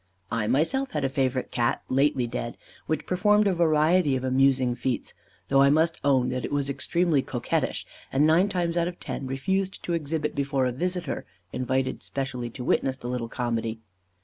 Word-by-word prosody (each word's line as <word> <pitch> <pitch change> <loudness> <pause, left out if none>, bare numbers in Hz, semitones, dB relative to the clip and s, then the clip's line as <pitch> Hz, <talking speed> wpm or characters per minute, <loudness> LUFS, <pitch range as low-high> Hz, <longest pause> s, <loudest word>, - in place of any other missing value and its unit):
I 115 -2 0
myself 260 - +1
had 150 - -1
a 135 - +1
favourite 130 -1 -1
Cat, 120 -1 0
lately 135 -1 +2
dead, 120 0 -4 0.3
which 155 - -1
performed 210 +3 +3
a 195 - +3
variety 160 -2 +3
of 130 - -2
amusing 130 -1 +3
feats, 125 +1 -2 0.3
though 135 0 +4
I 140 - +6
must 160 +3 +2
own 130 -3 +3
that 130 0 -2
it - - -4
was 140 -1 0
extremely 160 +2 +1
coquettish, 120 -2 -2 0.3
and 140 +3 +3
nine 170 +6 +4
times 175 -3 -1
out 170 0 +2
of 175 0 -6
ten 135 - -5
refused 190 +9 -1
to 175 - -2
exhibit 155 -1 -1
before 140 -2 0
a 125 - +1
visitor, 180 +7 -2 0.3
invited 130 +1 -1
specially 125 -3 -4
to 125 - -7
witness 130 +1 +1
the 120 - -6
little 125 -2 -3
comedy. 115 -2 -2
140 Hz, 180 wpm, -26 LUFS, 130-170 Hz, 0.3 s, I